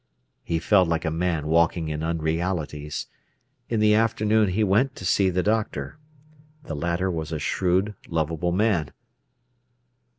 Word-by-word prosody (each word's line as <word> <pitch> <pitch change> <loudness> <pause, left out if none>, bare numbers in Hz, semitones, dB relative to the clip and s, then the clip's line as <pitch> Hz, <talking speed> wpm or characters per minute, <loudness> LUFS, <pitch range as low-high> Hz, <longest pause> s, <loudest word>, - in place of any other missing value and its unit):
He 85 - -1
felt 95 +2 +3
like 85 +1 -1
a 80 - 0
man 80 -2 -1
walking 85 +1 +2
in 75 0 -3
unrealities. 80 -2 -2 0.6
In 115 - 0
the 105 0 +4
afternoon 110 -1 +2
he 105 +4 +1
went 110 +7 +2
to 95 - -8
see 95 +1 +3
the 90 0 0
doctor. 110 +7 -1 0.6
The 80 - -5
latter 85 +5 -1
was 80 -2 -4
a 80 - -2
shrewd, 95 +6 0 0.2
lovable 80 +1 -1
man. 90 -7 +1
90 Hz, 140 wpm, -24 LUFS, 80-105 Hz, 0.6 s, the